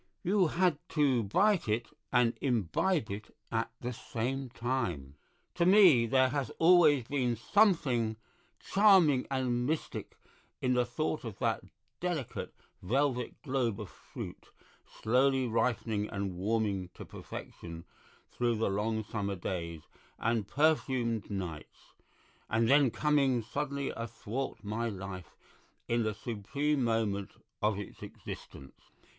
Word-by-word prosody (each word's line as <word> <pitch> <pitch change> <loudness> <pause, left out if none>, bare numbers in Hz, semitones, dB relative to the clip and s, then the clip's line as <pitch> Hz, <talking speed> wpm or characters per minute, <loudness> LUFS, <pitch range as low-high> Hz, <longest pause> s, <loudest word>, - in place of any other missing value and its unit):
You 190 0 +3
had 175 -2 +2 0.2
to 135 -5 +4
bite 185 - +2
it 110 +3 +1 0.3
and 125 -2 +4
imbibe 120 - +1
it 105 +2 -7 0.2
at 115 0 0
the 125 +1 -3
same 130 +4 -3
time. 115 - -2 0.4
To 175 - +1
me 180 - +7
there 130 +2 +4
has 135 -3 -2
always 165 -6 +6
been 125 -1 0
something 130 - +2 0.4
charming 190 -10 +5
and 125 -2 0
mystic 155 +1 -3 0.4
in 125 - +1
the 125 -1 +2
thought 155 +5 -2
of 115 -5 -6
that - - 0 0.4
delicate 170 -8 -3 0.3
velvet 125 +3 -1
globe 130 -7 0
of 105 -4 -7
fruit, - - -9 0.5
slowly 130 +3 +3
ripening 115 -2 0
and 100 -2 -3
warming 100 -1 -1
to - - -9
perfection 85 -1 -9 0.5
through 120 -1 0
the 110 -2 0
long 110 +2 -1
summer 100 -1 -3
days 85 -3 -4 0.4
and 115 -3 0
perfumed 130 -7 +1
nights, 90 -6 -6 0.6
and 115 +1 +2
then 140 0 +5
coming 135 -3 +2
suddenly 140 +4 -3
athwart 115 +3 -5
my 110 +3 -2
life 95 -3 -7 0.5
in 120 0 +1
the 110 -2 -1
supreme 135 +7 -1
moment 110 -4 0 0.3
of 105 -1 +2
its 105 - -8
existence. 70 -1 -9
120 Hz, 125 wpm, -31 LUFS, 105-140 Hz, 0.6 s, me